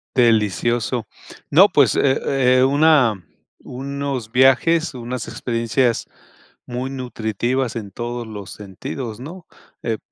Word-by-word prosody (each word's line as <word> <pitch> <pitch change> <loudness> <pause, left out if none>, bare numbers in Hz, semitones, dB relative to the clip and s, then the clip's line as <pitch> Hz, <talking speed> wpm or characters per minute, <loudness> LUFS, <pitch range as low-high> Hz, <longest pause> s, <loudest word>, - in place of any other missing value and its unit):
Delicioso. 115 0 +1 0.4
No, 190 +8 +7
pues 140 -8 +3
eh 135 -1 +2 0.4
eh - - +5
una 135 - +3 0.4
unos 135 -2 -4
viajes, 135 +6 +3
unas 125 -1 -5
experiencias 115 0 0 0.6
muy 125 +2 -4
nutritivas 125 0 -2
en 105 -4 -5
todos 120 +3 -5
los 100 -4 -8
sentidos, 105 +3 -7
¿no? 165 +6 -10 0.3
Eh, 115 -1 -2
125 Hz, 105 wpm, -20 LUFS, 115-135 Hz, 0.6 s, No